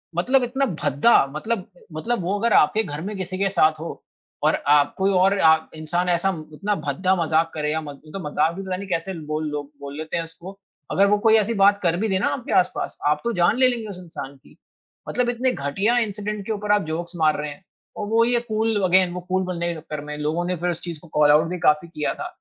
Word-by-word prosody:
मतलब 250 +9 +2
इतना 265 +3 0 0.2
भद्दा 145 - +4
मतलब 205 +4 -2 0.3
मतलब 225 +7 -2
वो 190 +4 0
अगर 235 +1 +2
आपके 215 +9 +4
घर 145 -4 -6
में 205 +4 -5
किसी 185 0 -4
के 195 0 +1
साथ 155 -5 +2
हो 165 - -7 0.4
और - - +4
आप 145 0 +4
कोई 195 +1 +2
और 190 +2 +3
आ 160 0 +7 0.2
इंसान 175 +3 -1
ऐसा 175 +2 +2 0.2
इतना 200 +7 -1
भद्दा 170 +4 0
मज़ाक 165 -1 +1
करें 150 -1 -1
या 160 - 0
म 150 - -8 0.2
ये - - -14
तो 195 - -5
मज़ाक 160 +2 +1
भी 195 - -5
पता 190 -1 -3
नहीं 200 +1 -7
कैसे 180 +1 -2
बोल 155 +1 -2
लोग 145 -1 -5
बोल 140 0 -7
लेते 160 +2 -3
हैं 165 - 0
उसको। 170 +3 -10 0.4
अगर 200 - +4
वो 205 +1 +3
कोई 220 +1 +5
ऐसी 220 +1 +2
बात 200 +1 +5
कर 170 -2 +2
भी 220 +4 0
दे 190 -1 +1
ना - - +1
आपके 245 -4 -4
आस-पास 180 - +1
आप 150 - +2
तो 235 - 0
जान 175 +4 +2
ले 255 0 +5
लेंगे 235 -3 -2
उस 195 - -7
इंसान 160 -6 -8
की 135 - -21 0.5
मतलब 250 -1 0
इतने 245 +2 +1
घटिया 195 +12 0
इन्सिडेंट 210 -2 -3
के 225 - -3
ऊपर 210 0 -2
आप 210 0 +4
जोक्स 170 +3 -4
मार 155 -2 +3
रहे 150 0 -3
हैं 145 +7 -11 0.3
और 205 - -4
वो 225 +2 +3
ये 240 0 +2
कूल 220 -1 +1
अगेन 185 0 +4
वो 180 - -4
कूल 185 +1 +1
बनने 170 -2 -3
के - - -8
चक्कर 150 -1 -6
में। 150 0 -6
लोगों 155 +4 -1
ने 180 +1 -1
फिर 175 +2 -1
उस 170 - -3
चीज़ 170 -3 -6
को 170 - -16
कॉल 150 -1 +4
ऑउट 155 +2 +4
भी 180 - -3
काफ़ी 150 +1 +3
किया 155 -3 -2
था, 355 - -6
180 Hz, 250 wpm, -23 LUFS, 155-205 Hz, 0.5 s, आ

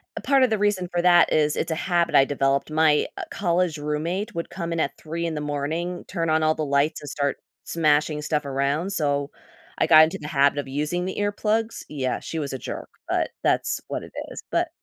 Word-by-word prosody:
A - - -5
part 275 -2 +4
of 255 - +4
the 220 - +1
reason 205 -3 +1
for 175 -1 0
that 175 -1 +5
is, 150 -1 +2
it's 165 - -1
a - - 0
habit 170 0 +1
I - - +8
developed. 135 +1 0
My, 155 -1 +3
uh, 390 - -4
college 175 -3 0
roommate 165 +9 -2
would 170 - -3
come 170 -2 -5
in 165 - -1
at - - -1
3 165 +2 -4
in 165 -2 -2
the 150 - -3
morning, 155 +5 -3
turn 165 -1 -2
on 155 0 +2
all 155 0 +3
the 155 - -2
lights, 140 +2 +1
and 145 - -7
start 140 0 -1 0.3
smashing 150 -1 +1
stuff 150 0 -1
around. 140 +6 -1
So, 145 -4 0 0.5
I - - +3
got 155 0 +9
into 160 - 0
the 150 - -6
habit 140 -1 +3
of 145 - -4
using 150 +6 -1
the 190 - -4
earplugs. 215 +2 -1
Yeah. 130 -4 -2
She 165 - -5
was 140 -3 -4
a - - -2
jerk, - - -6 0.2
but - - 0
that's - - +1
what - - -4
it - - -11 0.2
is. - - -8
But 345 -1 +1
155 Hz, 225 wpm, -24 LUFS, 145-175 Hz, 0.5 s, got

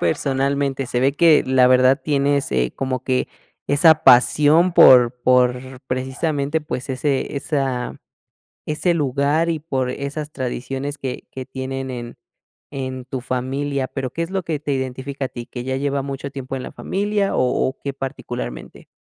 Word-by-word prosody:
personalmente?, 135 - 0
se 120 - -1
ve 135 +2 +3
que, 160 +1 +5
la 130 -1 +4
verdad, 130 +2 +4
tienes, 140 -1 0
eh, 60 -1 0
como 130 -2 -2
que 130 -1 0 0.4
esa 155 +2 +5
pasión 150 +8 +5
por 125 -8 +7
por 125 0 +3 0.3
precisamente, 140 +4 -1
pues 140 -3 -5
ese 135 +1 -1
esa, 135 -4 -2 0.7
ese 155 +3 0
lugar 145 +2 +1
y 165 - -1
por 135 -5 -2
esas 145 +3 -5
tradiciones 135 +2 -4
que 130 -2 -5
que 130 - -6
tienen 130 0 -5
en 120 -1 -7 0.6
en 130 -1 -5
tu 130 0 -4
familia, 135 +2 -2
pero 130 -2 -5
¿qué 165 - -3
es 165 - -4
lo 190 -1 -2
que 155 -3 -3
te 145 -1 -3
identifica 130 +1 -4
a - - -9
ti? 120 -2 -8
¿Que 120 -1 -7
ya 130 +1 -2
lleva 140 0 -1
mucho 140 0 -5
tiempo 135 -1 -6
en 130 - -5
la - - -7
familia 205 0 -1
o - - +3 0.3
o 130 - -7
qué 140 - -3
particularmente? 130 - -6
135 Hz, 165 wpm, -21 LUFS, 130-145 Hz, 0.7 s, por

